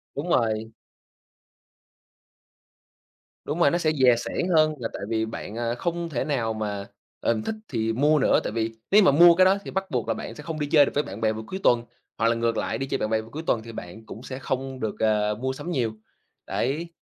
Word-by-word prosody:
Đúng 150 Hz, +5 st, -4 dB
rồi. 110 Hz, -4 st, +1 dB, 2.7 s
Đúng 150 Hz, +4 st, -3 dB
rồi, 145 Hz, -, +5 dB
nó 175 Hz, -, +2 dB
sẽ 155 Hz, -3 st, +1 dB
dè 125 Hz, -2 st, +7 dB
sẻn 175 Hz, +9 st, -2 dB
hơn 155 Hz, 0 st, +4 dB
là 115 Hz, -, -3 dB
tại -, -, -6 dB
vì 110 Hz, -1 st, 0 dB
bạn, 110 Hz, -1 st, -7 dB
à, 120 Hz, 0 st, -1 dB
không 170 Hz, +4 st, -3 dB
thể 125 Hz, -6 st, -1 dB
nào 120 Hz, -7 st, -1 dB
mà, 105 Hz, -2 st, -4 dB, 0.3 s
ừm, 110 Hz, -2 st, 0 dB
thích 220 Hz, -, -3 dB
thì 115 Hz, -2 st, -1 dB
mua 150 Hz, +4 st, +3 dB
nữa, -, -, +4 dB
tại -, -, -3 dB
vì 115 Hz, 0 st, 0 dB, 0.2 s
nếu 210 Hz, +1 st, +7 dB
như -, -, +4 dB
mà -, -, +7 dB
mua 170 Hz, +3 st, +7 dB
cái 185 Hz, +1 st, +5 dB
đó 195 Hz, +1 st, +4 dB
thì -, -, -6 dB
bắt 190 Hz, 0 st, -3 dB
buộc 125 Hz, -3 st, -1 dB
là -, -, +1 dB
bạn 115 Hz, -, -7 dB
sẽ 150 Hz, -, -10 dB
không 160 Hz, -1 st, -5 dB
đi 145 Hz, -, -1 dB
chơi 145 Hz, -1 st, +6 dB
được -, -, -4 dB
với 145 Hz, -, +2 dB
bạn 100 Hz, +4 st, -8 dB
bè 110 Hz, -1 st, +2 dB
vào 110 Hz, +1 st, -6 dB
cuối 190 Hz, -, -5 dB
tuần. 120 Hz, -1 st, +4 dB, 0.3 s
Hoặc 115 Hz, -, +2 dB
là 115 Hz, -, +3 dB
ngược 115 Hz, 0 st, 0 dB
lại, -, -, -1 dB
đi 135 Hz, -, -2 dB
chơi -, -, -1 dB
bạn 110 Hz, -, -2 dB
bè 110 Hz, 0 st, +1 dB
vào 110 Hz, -, -13 dB
cuối 155 Hz, +3 st, -6 dB
tuần 115 Hz, -, +2 dB
thì 115 Hz, -, -9 dB
bạn 110 Hz, +2 st, -9 dB
cũng 115 Hz, +4 st, -10 dB
sẽ 130 Hz, 0 st, -6 dB
không 130 Hz, 0 st, -3 dB
được, 110 Hz, -2 st, -3 dB
ờ, 105 Hz, -1 st, +2 dB
mua 130 Hz, 0 st, -1 dB
sắm 175 Hz, +6 st, -6 dB
nhiều, 120 Hz, -7 st, 0 dB, 0.5 s
đấy. 160 Hz, +7 st, -2 dB
125 Hz, 245 wpm, -25 LUFS, 110-155 Hz, 2.7 s, dè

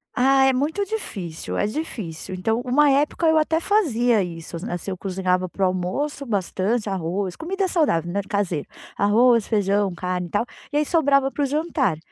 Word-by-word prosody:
Ah, 270 Hz, +1 st, +4 dB
é 265 Hz, -, +4 dB
muito 300 Hz, +10 st, 0 dB
difícil, 195 Hz, -, -5 dB
é -, -, +1 dB
difícil. 210 Hz, -, -5 dB
Então, 225 Hz, +5 st, 0 dB
uma 280 Hz, +4 st, +3 dB
época 290 Hz, +4 st, +2 dB
eu 320 Hz, 0 st, +4 dB
até 315 Hz, +1 st, +2 dB
fazia 245 Hz, -, +2 dB
isso 170 Hz, -1 st, -6 dB
n 195 Hz, +8 st, -6 dB
assim, 175 Hz, +2 st, -4 dB
eu 185 Hz, -, -4 dB
cozinhava 185 Hz, -1 st, -1 dB
para 195 Hz, +2 st, -4 dB
o -, -, +5 dB
almoço 185 Hz, +11 st, -2 dB
bastante 205 Hz, +1 st, -1 dB
arroz, 185 Hz, 0 st, -2 dB
comida 380 Hz, +4 st, -2 dB
saudável, 175 Hz, -, +1 dB
né, 200 Hz, +2 st, 0 dB
caseira, 195 Hz, -8 st, -1 dB, 0.3 s
arroz, 230 Hz, +2 st, +4 dB
feijão, 200 Hz, -2 st, +1 dB
carne 180 Hz, 0 st, -3 dB
e -, -, -15 dB
tal, 210 Hz, +3 st, +1 dB, 0.3 s
e -, -, +2 dB
aí 300 Hz, -, +2 dB
sobrava 280 Hz, -4 st, +3 dB
para 290 Hz, -, -1 dB
o -, -, +3 dB
jantar. 285 Hz, -, 0 dB
220 Hz, 185 wpm, -23 LUFS, 185-290 Hz, 0.3 s, o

